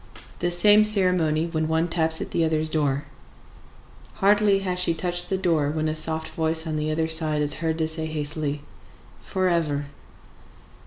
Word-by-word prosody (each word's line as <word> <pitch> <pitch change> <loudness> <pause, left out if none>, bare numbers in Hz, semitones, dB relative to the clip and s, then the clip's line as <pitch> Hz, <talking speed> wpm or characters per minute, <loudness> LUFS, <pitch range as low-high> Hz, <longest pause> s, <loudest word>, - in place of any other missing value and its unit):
The 175 - 0
same 205 +5 +5
ceremony 180 -7 +2
when 160 -2 -2
one 160 +1 0
taps 160 -1 +1
at - - -6
the 165 - +1
other's 155 -1 0
door. 145 -2 0 1.1
Hardly 205 0 +3
has 180 -2 -3
she 170 -2 +1
touched 175 +1 -3
the 190 - 0
door 165 -6 +1
when 155 +1 -2
a 155 - -1
soft 160 0 0
voice 160 0 -1
on 155 -1 -3
the 150 0 -2
other 160 +1 -1
side 155 -2 0
is 145 - 0
heard 160 -1 -1
to 160 -1 0
say 160 0 -2
hastily, 150 -1 -3 0.6
"Forever!" 165 -6 -1
160 Hz, 165 wpm, -24 LUFS, 155-175 Hz, 1.1 s, same